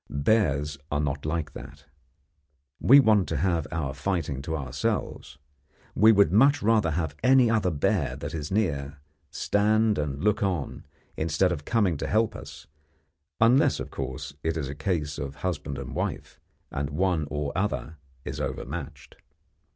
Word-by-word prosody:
Bears 75 Hz, -3 st, +1 dB
are 70 Hz, -, 0 dB
not 75 Hz, 0 st, -2 dB
like 80 Hz, -1 st, -2 dB
that. 70 Hz, +1 st, -11 dB, 0.9 s
We 140 Hz, +3 st, +7 dB
want 110 Hz, -7 st, +3 dB
to 80 Hz, -, -1 dB
have 85 Hz, -1 st, 0 dB
our 75 Hz, -5 st, -2 dB
fighting 70 Hz, -2 st, -2 dB
to 80 Hz, +3 st, -3 dB
ourselves. 70 Hz, 0 st, -3 dB, 0.6 s
We 110 Hz, +2 st, +6 dB
would 100 Hz, -6 st, +4 dB
much 135 Hz, +6 st, +4 dB
rather 110 Hz, -5 st, +3 dB
have 80 Hz, -2 st, -2 dB
any 130 Hz, -2 st, +5 dB
other 110 Hz, -5 st, +2 dB
bear 75 Hz, -4 st, 0 dB
that -, -, -6 dB
is 75 Hz, -3 st, -4 dB
near 75 Hz, -9 st, -1 dB, 0.3 s
stand 105 Hz, 0 st, +1 dB
and 75 Hz, 0 st, -3 dB
look 105 Hz, 0 st, +2 dB
on 90 Hz, -8 st, -2 dB, 0.3 s
instead 85 Hz, +4 st, +1 dB
of 75 Hz, -4 st, -4 dB
coming 100 Hz, -9 st, +1 dB
to -, -, -4 dB
help 110 Hz, 0 st, +1 dB
us -, -, -10 dB, 0.7 s
unless, 130 Hz, +6 st, +4 dB
of -, -, -6 dB
course, 65 Hz, +1 st, -5 dB
it 80 Hz, 0 st, -1 dB
is 70 Hz, -4 st, -3 dB
a -, -, -4 dB
case 75 Hz, -2 st, -2 dB
of 70 Hz, -2 st, -5 dB
husband 75 Hz, -6 st, -3 dB
and 70 Hz, -2 st, -6 dB
wife, -, -, -4 dB, 0.3 s
and 70 Hz, 0 st, -3 dB
one 80 Hz, 0 st, 0 dB
or 75 Hz, -1 st, -3 dB
other 90 Hz, -4 st, -2 dB, 0.3 s
is -, -, -5 dB
overmatched. 70 Hz, -1 st, -6 dB
80 Hz, 155 wpm, -26 LUFS, 70-105 Hz, 0.9 s, We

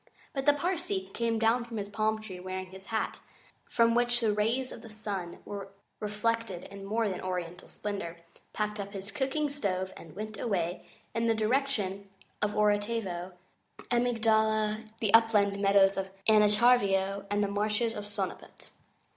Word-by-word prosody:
But 270 Hz, 0 st, -3 dB
the 290 Hz, -, +8 dB
Parsee 285 Hz, -, -2 dB
came 230 Hz, -1 st, 0 dB
down 225 Hz, +2 st, +3 dB
from 235 Hz, -1 st, -7 dB
his 200 Hz, -1 st, -3 dB
palm 215 Hz, +1 st, 0 dB
tree, 195 Hz, -4 st, -8 dB
wearing 185 Hz, 0 st, -5 dB
his 190 Hz, +1 st, -11 dB
hat, 220 Hz, -1 st, -2 dB, 0.5 s
from 230 Hz, 0 st, +4 dB
which 240 Hz, 0 st, +3 dB
the 220 Hz, -3 st, +2 dB
rays 230 Hz, +5 st, 0 dB
of -, -, -9 dB
the 225 Hz, -, -11 dB
sun 205 Hz, -5 st, -4 dB
were 200 Hz, -1 st, -6 dB, 0.3 s
reflected 210 Hz, -2 st, -1 dB
in 195 Hz, 0 st, -8 dB
more 220 Hz, +2 st, +1 dB
than 190 Hz, -2 st, -3 dB
oriental 180 Hz, -1 st, -4 dB
splendour, 200 Hz, -5 st, -4 dB, 0.3 s
packed 210 Hz, 0 st, -2 dB
up 200 Hz, +1 st, -5 dB
his 195 Hz, +1 st, -5 dB
cooking 285 Hz, +2 st, 0 dB
stove, 190 Hz, -9 st, -2 dB
and 165 Hz, -1 st, -12 dB
went 215 Hz, +1 st, -6 dB
away 180 Hz, -6 st, -1 dB, 0.3 s
in 230 Hz, 0 st, +1 dB
the 225 Hz, -, +3 dB
direction 215 Hz, -4 st, 0 dB, 0.3 s
of 210 Hz, 0 st, 0 dB
Orotavo, 205 Hz, -4 st, 0 dB, 0.6 s
Amygdala, 220 Hz, -2 st, +2 dB
the 215 Hz, -2 st, +1 dB
Upland 210 Hz, -3 st, +5 dB
Meadows 195 Hz, -1 st, +5 dB
of 190 Hz, 0 st, -2 dB, 0.2 s
Anantarivo, 205 Hz, -2 st, +4 dB
and 205 Hz, 0 st, +1 dB
the -, -, +1 dB
Marshes 210 Hz, +3 st, 0 dB
of 205 Hz, -, -5 dB
Sonaput. 205 Hz, 0 st, -6 dB
210 Hz, 155 wpm, -30 LUFS, 195-230 Hz, 0.6 s, the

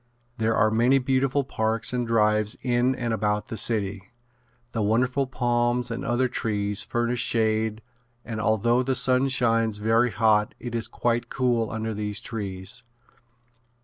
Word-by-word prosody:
There 110 Hz, 0 st, +1 dB
are 110 Hz, +1 st, +3 dB
many 120 Hz, +5 st, +4 dB
beautiful 135 Hz, +1 st, +1 dB
parks 110 Hz, -2 st, -1 dB
and 125 Hz, -1 st, -1 dB
drives 105 Hz, -2 st, +2 dB
in 125 Hz, +1 st, +1 dB
and 120 Hz, -2 st, -2 dB
about 105 Hz, -1 st, -1 dB
the -, -, -4 dB
city. 100 Hz, -2 st, -1 dB, 0.6 s
The 115 Hz, -, -2 dB
wonderful 125 Hz, +6 st, +1 dB
palms 120 Hz, -1 st, 0 dB
and 115 Hz, +4 st, -4 dB
other 130 Hz, -1 st, +1 dB
trees 105 Hz, -4 st, -1 dB
furnish 120 Hz, +1 st, -1 dB
shade 110 Hz, -1 st, 0 dB, 0.4 s
and 110 Hz, -2 st, -4 dB
although 110 Hz, +4 st, +2 dB
the 130 Hz, +1 st, -1 dB
sun 130 Hz, +1 st, +3 dB
shines 115 Hz, -4 st, +1 dB
very 115 Hz, +3 st, +2 dB
hot 110 Hz, -2 st, +2 dB
it 120 Hz, -1 st, -6 dB
is 115 Hz, -1 st, -2 dB
quite 120 Hz, 0 st, -1 dB
cool 120 Hz, -4 st, 0 dB
under 110 Hz, 0 st, -3 dB
these 105 Hz, 0 st, -3 dB
trees. 100 Hz, +1 st, -5 dB
115 Hz, 145 wpm, -25 LUFS, 110-125 Hz, 0.6 s, many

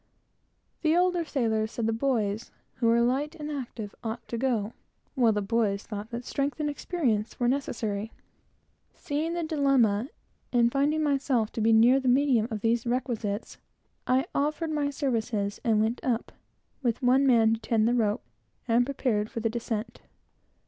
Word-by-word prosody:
The 315 Hz, -1 st, +3 dB
older 360 Hz, -1 st, +2 dB
sailors 220 Hz, -7 st, -1 dB
said 230 Hz, -, -2 dB
the 225 Hz, -, +1 dB
boys, 225 Hz, -4 st, -1 dB, 0.3 s
who 235 Hz, -, +1 dB
were 230 Hz, +1 st, +4 dB
light 275 Hz, +6 st, 0 dB
and 300 Hz, -2 st, -6 dB
active, 235 Hz, -7 st, -6 dB
ought 230 Hz, +1 st, -5 dB
to 235 Hz, -, -3 dB
go, 235 Hz, -4 st, 0 dB, 0.4 s
while 245 Hz, -5 st, +4 dB
the 210 Hz, -1 st, -1 dB
boys 205 Hz, -2 st, 0 dB
thought 210 Hz, 0 st, -6 dB
that 240 Hz, 0 st, -6 dB
strength 280 Hz, +1 st, -2 dB
and 295 Hz, -1 st, 0 dB
experience 250 Hz, -9 st, -2 dB
were 245 Hz, -, +2 dB
necessary. 225 Hz, -5 st, -2 dB, 0.8 s
Seeing 305 Hz, +3 st, -2 dB
the 345 Hz, -, -1 dB
dilemma, 275 Hz, -7 st, +2 dB, 0.4 s
and 235 Hz, -1 st, +3 dB
feeling 295 Hz, +3 st, +1 dB
myself 270 Hz, -6 st, +1 dB
to 225 Hz, -, -4 dB
be 225 Hz, +1 st, +4 dB
near 235 Hz, +4 st, +6 dB
the 265 Hz, -, -3 dB
medium 250 Hz, -3 st, +3 dB
of 215 Hz, -3 st, -4 dB
these 230 Hz, +2 st, +1 dB
requisites, 235 Hz, -4 st, -2 dB, 0.5 s
I 260 Hz, +2 st, +3 dB
offered 305 Hz, +3 st, -1 dB
my 295 Hz, -2 st, 0 dB
services, 225 Hz, -7 st, -2 dB
and 220 Hz, -2 st, +3 dB
went 220 Hz, +3 st, 0 dB
up, 235 Hz, -3 st, -1 dB, 0.5 s
with 240 Hz, -2 st, -1 dB
one 260 Hz, +3 st, +4 dB
man 225 Hz, -3 st, +5 dB
to 225 Hz, -, -2 dB
tend 225 Hz, -1 st, +1 dB
the 240 Hz, -, +2 dB
rope, 220 Hz, -1 st, +1 dB, 0.4 s
and 235 Hz, +1 st, +3 dB
prepared 235 Hz, -6 st, -1 dB
for -, -, -5 dB
the 225 Hz, 0 st, -1 dB
descent. 230 Hz, -1 st, -4 dB
240 Hz, 165 wpm, -27 LUFS, 220-275 Hz, 0.8 s, near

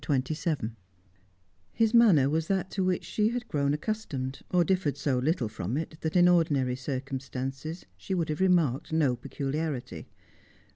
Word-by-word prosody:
CHAPTER 135 Hz, 0 st, 0 dB
XXVII 150 Hz, -8 st, -2 dB, 1.0 s
His 225 Hz, 0 st, +2 dB
manner 205 Hz, -, +6 dB
was 160 Hz, +3 st, 0 dB
that 190 Hz, -1 st, -1 dB
to 190 Hz, -, -1 dB
which 185 Hz, -1 st, 0 dB
she 215 Hz, 0 st, +1 dB
had 245 Hz, +1 st, -4 dB
grown 140 Hz, -1 st, 0 dB
accustomed, 150 Hz, -, -3 dB
or 180 Hz, -1 st, +3 dB
differed 170 Hz, -6 st, 0 dB
so 135 Hz, -2 st, 0 dB
little 135 Hz, -2 st, 0 dB
from 105 Hz, +3 st, -3 dB
it 160 Hz, 0 st, -5 dB
that, 160 Hz, +1 st, -2 dB
in 175 Hz, 0 st, +6 dB
ordinary 145 Hz, -8 st, +3 dB
circumstances, 135 Hz, +3 st, -5 dB
she 190 Hz, -, -3 dB
would 165 Hz, -3 st, -1 dB
have 155 Hz, +3 st, -2 dB
remarked 170 Hz, -10 st, +2 dB
no 150 Hz, -6 st, +2 dB
peculiarity. 140 Hz, +2 st, -4 dB
155 Hz, 155 wpm, -28 LUFS, 135-180 Hz, 1.0 s, manner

